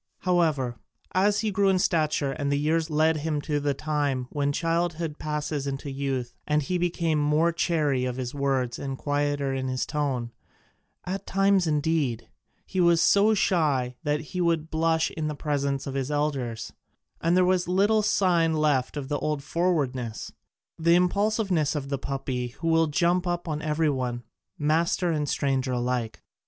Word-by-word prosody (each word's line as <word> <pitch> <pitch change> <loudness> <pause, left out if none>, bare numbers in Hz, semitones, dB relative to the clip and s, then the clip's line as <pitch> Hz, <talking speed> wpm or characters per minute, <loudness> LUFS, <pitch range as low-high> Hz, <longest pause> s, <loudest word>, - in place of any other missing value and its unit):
However, 155 -9 +1 0.3
as 205 +2 +2
he 220 -2 -1
grew 200 0 +2
in 190 - +3
stature 155 -5 +1
and 140 +1 -2
the 140 - +2
years 160 +2 +1
led 155 +1 +2
him 150 0 -1
to 145 0 -1
the 145 -1 0
time 145 -4 -1
when 145 -1 0
childhood 165 0 -1
passes 150 -2 -3
into 135 +1 -4
youth 135 -3 -3 0.3
he 180 +5 -1
became 170 -3 0
more 150 +3 +2
chary 150 -6 0
of 125 -1 -2
his 125 -1 -4
words 135 -4 -1
and 135 -1 -4
quieter 145 -1 -1
in 130 0 -2
his 130 0 -1
tone: 135 -6 -2 0.7
at 190 +2 -4
times, 195 -2 +3
indeed, 150 -6 0 0.4
he 185 - -1
was 170 -1 +5
so 205 +5 +4
shy 145 -10 +1
that 150 -1 0
he 180 +4 -4
would 165 -2 0
blush 160 0 +1
in 155 -2 -3
the 150 - -3
presence 140 -2 -1
of 135 - -4
his 135 0 -2
elders, 140 -6 -2 0.5
and 170 +2 +2
there 185 - +5
was 180 -1 +1
little 200 +4 +3
sign 175 -6 +2
left 150 -3 +1
of 140 -2 -4
the 145 +1 -1
old 150 -2 -2
forwardness, 135 -10 -1 0.5
the 170 +1 +4
impulsiveness 180 -3 +1
of 140 -2 -4
the 140 -1 -2
puppy 135 -3 -3
who 145 +7 -6
will 165 0 +4
jump 175 +4 +1
up 175 0 -2
on 155 -1 -2
every 155 +1 0
one, 125 -4 -2 0.3
master 165 +4 +1
and 150 -3 -1
stranger 135 -2 0
alike. 120 -2 -2
150 Hz, 170 wpm, -26 LUFS, 135-170 Hz, 0.7 s, was